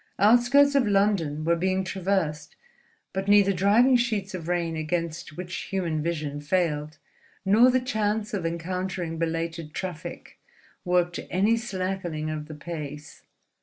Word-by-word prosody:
Outskirts 245 +7 +5
of 275 -5 +3
London 195 -7 +1
were 170 +1 +3
being 185 +2 0
traversed; 185 -5 -2 0.6
but 190 +1 -3
neither 200 -1 +5
driving 210 +8 +4
sheets 215 -5 -1
of 170 -3 -6
rain 170 -2 -1
against 160 0 -3
which 180 0 -5
human 170 -5 -1
vision 150 -3 -3
failed, 155 -2 -1 0.5
nor 220 +6 +6
the 255 0 +3
chance 215 -3 -1
of 195 -4 -2
encountering 170 0 -3
belated 165 -1 -3
traffic, 180 -5 -6 0.4
worked 175 -1 +1
any 205 +5 +3
slackening 185 -8 -3
of 150 -1 -5
the 155 - -8
pace. 150 -1 -7
180 Hz, 130 wpm, -26 LUFS, 160-200 Hz, 0.6 s, nor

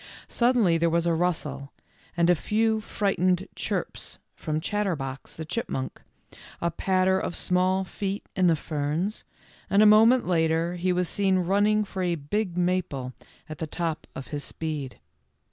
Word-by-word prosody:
Suddenly 235 -9 +3
there 170 0 +3
was 170 +1 +1
a 170 - +2
rustle, 155 -5 -2 0.5
and 170 0 +4
a 180 - +6
few 220 +6 +1
frightened 190 -3 0
"chirps" - - -3 0.2
from 155 -1 -2
Chatterbox, 160 -9 -3
the 160 - -6
chipmunk, 150 - -3 0.6
a 170 - 0
patter 190 +2 +2
of 175 - -3
small 185 +1 +1
feet 195 +1 -4
in 185 -1 +3
the 165 - +4
ferns, 155 +7 -2 0.4
and 200 +2 +5
a - - +6
moment 225 +4 +6
later 165 0 +1
he 180 +1 0
was 180 0 +1
seen 195 0 +1
running 205 +4 +2
for 190 -2 -5
a 175 -2 +1
big 180 +5 -2
maple 175 -8 -1 0.3
at 155 +1 -8
the 160 - -3
top 165 0 -3
of 135 - -7
his 145 -1 -4
speed. 150 -5 -5
180 Hz, 155 wpm, -26 LUFS, 160-195 Hz, 0.6 s, a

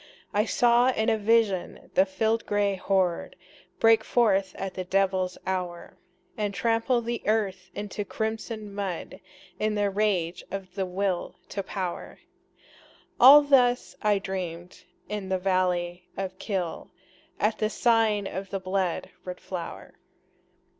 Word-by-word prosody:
I 210 +1 +2
saw 240 +1 +4
in 225 -2 +1
a 220 - +2
vision 210 -4 +1
the 190 - +4
field 220 +4 0
gray 205 -1 +1
horde 185 -2 0 0.4
Break 225 -1 +5
forth 195 -6 +2
at 195 -1 -5
the 185 - -4
devil's 185 -1 0
hour, 180 -2 -4 0.4
And 205 -4 -2
trample 235 +1 +1
the 235 0 -3
earth 195 -4 0
into 205 0 -4
crimson 220 0 -4
mud 195 -4 -4 0.4
In 215 0 0
the 205 -1 +1
rage 190 -4 0
of 190 -2 -6
the 190 -1 -2
Will 185 0 -2
to 200 - -3
Power, 185 -2 -5 1.0
All 280 +4 +10
this 250 -3 +3
I 210 -2 +3
dreamed 180 -3 -6 0.2
in 205 -2 -4
the 190 - +1
valley 180 -2 0
of 190 -1 -4
Kyll, 185 -6 -3 0.5
At 215 +1 +1
the 215 - +1
sign 225 -3 +2
of 195 0 -5
the 195 - -3
blood 185 -1 -2
red 180 -1 -6
flower. 180 -3 -7
195 Hz, 135 wpm, -27 LUFS, 185-220 Hz, 1.0 s, All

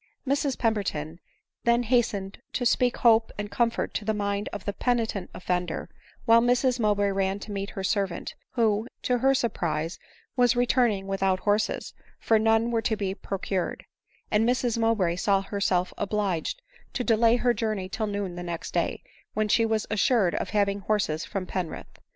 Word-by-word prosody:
Mrs 280 -1 +1
Pemberton 180 -8 -1 0.4
then 235 +1 +3
hastened 215 -5 0
to 245 - -1
speak 245 +1 +2
hope 225 -1 +4
and 205 0 -4
com 235 -1 +2
fort - - -4
to - - -2
the 215 +1 0
mind 200 0 -1
of 195 - -7
the 205 - -2
penitent 225 -5 -1
offender, 180 -2 -3 0.4
while 230 0 +6
Mrs 245 +1 +2
Mowbray 205 -2 +2
ran 195 0 0
to 205 +1 -9
meet 200 0 -3
her 195 - -6
servant, 195 -2 -1 0.2
who, 220 -1 +1 0.2
to 250 -1 +1
her 270 +2 +4
surprise, 170 -9 -1 0.4
was 245 -1 +4
returning 240 -5 +2
without 195 -1 0
horses, 210 +1 0 0.2
for 225 -1 +2
none 225 +1 +3
were 230 -1 +1
to 220 0 0
be 195 -2 -2
pro* 195 0 -5
cured; 185 -1 -3 0.5
and 210 +1 +3
Mrs 245 -2 +1
Mowbray 220 -7 +1
saw 195 +1 +2
herself 195 -3 0
obliged 205 - -1 0.3
to 250 - -1
delay 230 0 +4
her 245 0 +2
journey 215 -5 -2
till 215 +3 -3
noon 200 -3 -3
the 175 - -6
next 170 -1 -5
day, - - -1 0.3
when 215 0 +1
she 225 +2 +3
was 220 -1 0
assured 215 -3 +3
of - - -2
having 200 -1 +1
horses 195 -6 0
from 195 -3 -4
Penrith. 180 -3 -5
210 Hz, 175 wpm, -27 LUFS, 195-230 Hz, 0.5 s, while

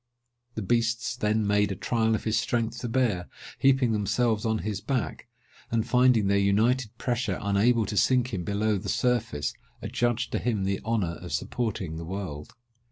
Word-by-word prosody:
The 110 - -3
beasts 120 +3 0
then 110 -3 +1
made 105 0 +2
a - - -2
trial 110 +3 +1
of - - -4
his 110 0 0
strength 115 +1 -1
to 120 - -4
bear, 115 -8 0 0.3
heaping 135 -3 +4
themselves 110 +1 +1
on 110 0 +1
his 105 -2 -2
back; 130 -3 -3 0.4
and 115 -1 0
finding 125 -4 +4
their 100 0 +3
united 110 +4 +1
pressure 125 0 -1
unable 105 +3 +2
to 105 - -4
sink 125 +2 +2
him 90 -3 -2
below 105 +1 0
the - - -6
surface, 115 - 0 0.3
adjudged 120 0 -1
to - - 0
him 110 -5 -1
the 95 0 -1
honour 105 -7 -1
of 90 - -7
supporting 100 -9 -2
the 85 - -6
world. 90 -2 -6
110 Hz, 170 wpm, -27 LUFS, 100-120 Hz, 0.4 s, heaping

